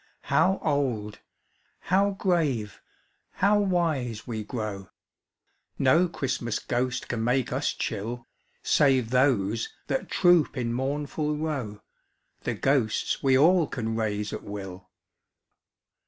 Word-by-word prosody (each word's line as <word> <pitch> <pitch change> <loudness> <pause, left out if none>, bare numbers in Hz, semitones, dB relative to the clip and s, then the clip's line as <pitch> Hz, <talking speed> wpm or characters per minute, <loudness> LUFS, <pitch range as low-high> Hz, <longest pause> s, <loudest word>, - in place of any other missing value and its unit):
How 190 +1 +4
old, 115 -8 -1 0.6
how 195 +2 +2
grave, 160 - -1 0.5
how 205 +2 +3
wise 160 - 0
we 110 -3 -4
grow! 105 -5 -5 0.9
No 160 +7 +4
Christmas 130 -7 -2
ghost 125 +1 -2
can 115 -2 -2
make 125 +1 +1
us 135 +3 0
chill, 115 +3 -4 0.4
Save 130 -5 +3
those 115 -5 +2 0.2
that 265 - -2
troop 175 -6 +3
in 120 -2 -1
mournful 145 +3 -2
row, 135 -10 -4 0.6
The - - -1
ghosts 130 -6 0
we 135 -1 +4
all 165 +3 +5
can 115 -4 -3
raise 105 -2 -2
at - - -5
will! 95 -3 -8
130 Hz, 110 wpm, -27 LUFS, 110-150 Hz, 0.9 s, all